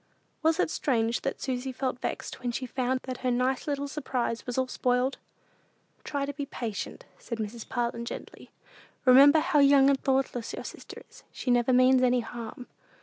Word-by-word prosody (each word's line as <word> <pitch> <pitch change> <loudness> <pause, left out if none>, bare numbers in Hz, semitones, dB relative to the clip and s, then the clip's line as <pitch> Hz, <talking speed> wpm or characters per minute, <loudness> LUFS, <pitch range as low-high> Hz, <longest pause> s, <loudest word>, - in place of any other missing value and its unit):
Was 320 0 +2
it - - +1
strange 230 -3 0
that 275 - -3
Susy 260 0 -3
felt 255 -1 -3
vexed - - -4
when 245 -1 -1
she 255 +2 -3
found 255 +1 -1
that 255 -1 -6
her 255 - -1
nice 250 +3 0
little 285 -1 -1
surprise 255 -5 -3
was 245 - -3
all 260 - +2
spoiled? 250 +1 0 0.8
"Try 280 -1 -2
to 285 - -5
be 285 0 -5
patient," 225 -7 -5
said 230 - -5
Mrs. 220 +1 -6
Parlin, 235 -1 -2
gently. - - -8 0.6
"Remember 275 +4 +8
how 335 -3 +2
young 280 -1 +6
and 270 - 0
thoughtless 260 -3 0
your - - -6
sister - - -9
is. - - -17
She 250 - -2
never 245 +1 +3
means 255 +1 +5
any 250 -1 +3
harm." 235 +1 -8
255 Hz, 180 wpm, -28 LUFS, 245-275 Hz, 0.8 s, Remember